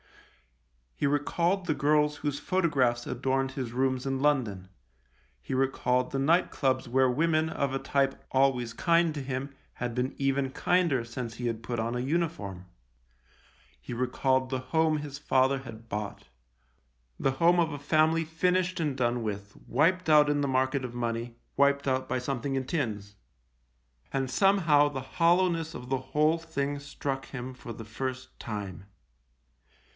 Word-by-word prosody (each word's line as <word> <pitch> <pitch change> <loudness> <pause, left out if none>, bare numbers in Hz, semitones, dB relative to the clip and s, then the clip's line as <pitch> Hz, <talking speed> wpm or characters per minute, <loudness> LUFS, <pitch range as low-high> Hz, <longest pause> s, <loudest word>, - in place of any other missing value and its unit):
He - - -1
recalled 170 +6 +1
the 155 -4 0
girls 150 +1 +2
whose 145 -1 -2
photographs 135 -10 +1
adorned 135 +1 0
his 130 -4 -4
rooms 130 +1 0
in 135 -1 -1
London; 120 -10 0 0.7
he - - -6
recalled 130 -1 +1
the 135 - -1
night 165 +6 +3
clubs 130 -2 0
where 130 +1 +3
women, 155 +4 +2
of 140 -3 -1
a 135 - 0
type, 135 0 0
always 130 -3 +2
kind 170 +1 +2
to 145 - -4
him, 135 +1 -4 0.2
had 120 -1 -4
been 125 +2 -1
even 135 -1 0
kinder 170 -4 +2
since 115 0 -6
he 120 0 -3
had 115 -1 -3
put 120 0 -3
on 115 +2 -1
a - - -1
uniform; 130 - -2 1.1
he - - -7
recalled 130 +1 +1
the 130 -1 -1
home 155 +4 +1
his 145 -2 -6
father 135 -1 +2
had 115 -3 -11
bought 105 - -5 0.5
— - - -42
the 135 - +2
home 170 +5 +4
of 165 -2 +2
a 145 - -5
family, 155 +3 +3
finished 180 +3 0
and 150 -4 0
done 120 -1 +1
with, 100 -1 -5
wiped 165 +7 +2
out 150 -1 +6
in 145 0 +1
the 140 - +1
market 130 +1 +1
of 120 - -7
money, 115 0 -3 0.2
wiped 140 0 +3
out 130 0 0
by 130 - 0
something 135 +1 -2
in 130 -1 -1
tins; 105 - -3 1.0
and 135 -1 -1
somehow 165 -5 +4
the 135 -2 -4
hollow 175 +5 +3
ness 165 -2 -3
of 125 - -8
the 135 0 +1
whole 155 +2 +3
thing 145 -3 -3
struck 140 -1 -4
him 130 0 -6
for 120 - -9
the 115 0 -9
first 130 +3 -5
time. 100 -5 -6
135 Hz, 165 wpm, -29 LUFS, 125-150 Hz, 1.1 s, out